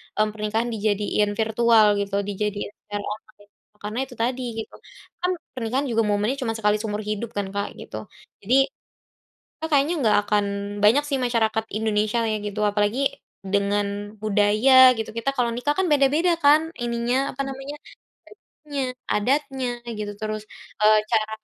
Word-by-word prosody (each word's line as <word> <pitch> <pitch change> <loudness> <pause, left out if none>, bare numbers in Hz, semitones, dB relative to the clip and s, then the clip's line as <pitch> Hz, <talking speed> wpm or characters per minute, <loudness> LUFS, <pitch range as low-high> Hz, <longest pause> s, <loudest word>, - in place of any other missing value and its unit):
mmm, 215 0 +2
pernikahan 215 +2 -2
dijadiin 210 -1 0
virtual 225 0 +4
gitu, 200 0 -2
dijadiin 205 0 -3 0.2
secara 205 -1 -4
online. 210 -1 -9 0.3
Karena 215 +4 -3
itu 250 - -12
tadi 245 +3 -1 0.2
gitu. - - -21 0.5
Kan, 360 +1 0 0.2
pernikahan 255 +2 -2
juga 225 -1 +2
momennya 210 +6 0
cuma 230 -4 -2
sekali 210 -1 +1
seumur 210 -1 -3
hidup 215 +2 -4
kan 200 -1 -2
Kak, 200 0 -3
gitu. - - -8 0.4
Jadi, 250 - +4 1.1
a - - +1
kayaknya 290 +3 +3
nggak 215 -2 +4
akan 210 -1 +2 0.4
banyak 240 +8 +5
sih 285 - 0
masyarakat 225 -2 +1 0.2
Indonesia 215 +1 +1
ya 215 - 0
gitu. 205 0 -4
Apalagi 205 +4 +1 0.5
dengan 200 +1 -1
budaya 215 +4 +3 0.2
gitu, 225 - -3
kita 230 +4 -1
kalau 240 -2 +1
nikah 270 +5 -1
kan 380 - +2
beda-beda 295 +5 +3
kan? 310 +3 +5
Ininya, 240 +3 0
apa 275 - -4
namanya? 270 +2 -6 0.7
Bajunya, 290 -2 -6 0.2
adatnya, 265 +3 0 0.3
gitu 205 -1 -4
terus, 215 0 -3 0.4
eee, 215 0 +6
cara 220 -2 +1
220 Hz, 150 wpm, -24 LUFS, 210-255 Hz, 1.1 s, eee